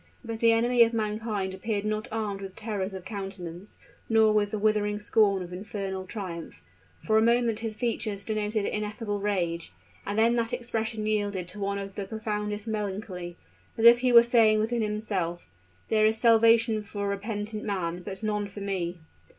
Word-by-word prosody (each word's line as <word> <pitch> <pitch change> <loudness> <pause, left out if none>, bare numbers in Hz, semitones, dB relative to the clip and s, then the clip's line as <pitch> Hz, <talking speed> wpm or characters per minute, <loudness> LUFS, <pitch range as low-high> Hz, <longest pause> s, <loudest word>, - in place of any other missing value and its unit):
But 225 -1 -5
the 230 0 +5
enemy 240 +2 +3
of 230 0 +5
mankind 210 -3 -2
appeared 205 +1 -2
not 215 0 -2
armed 210 -3 -3
with 195 -1 -8
terrors 205 -3 -3
of 190 -1 -8
countenance, 195 -3 -7 0.3
nor 220 -1 +5
with 210 -1 +2
the 215 - -3
withering 210 0 +1
scorn 205 -2 +2
of 175 0 -9
infernal 190 -1 -5
triumph; 180 -6 -7 0.4
for 220 -1 +3
a - - +3
moment 235 -1 +2
his 225 -2 -4
features 215 -3 -2
denoted 215 -1 -1
ineffable 210 0 -3
rage 175 - -1 0.3
and 205 +1 -3
then 230 +2 +4
that 230 -1 -1
expression 225 -2 -2
yielded 205 -4 -1
to 210 - -6
one 200 0 -1
of 195 0 -6
the 200 0 -4
profoundest 210 0 -3
melancholy, 195 -4 -4 0.4
as 225 - +1
if 235 +1 +9
he 250 0 +2
were 235 -1 +9
saying 230 -3 +5
within 230 +2 0
himself, 200 - -3 0.4
"There 215 -1 +4
is 220 +1 +2
salvation 230 -1 +5
for 205 -1 -4
repentant 210 +1 -3
man, 180 -4 -2
but 195 +3 -7
none 210 -1 -1
for 200 0 -9
me!" 185 -3 -2
210 Hz, 175 wpm, -27 LUFS, 195-220 Hz, 0.4 s, if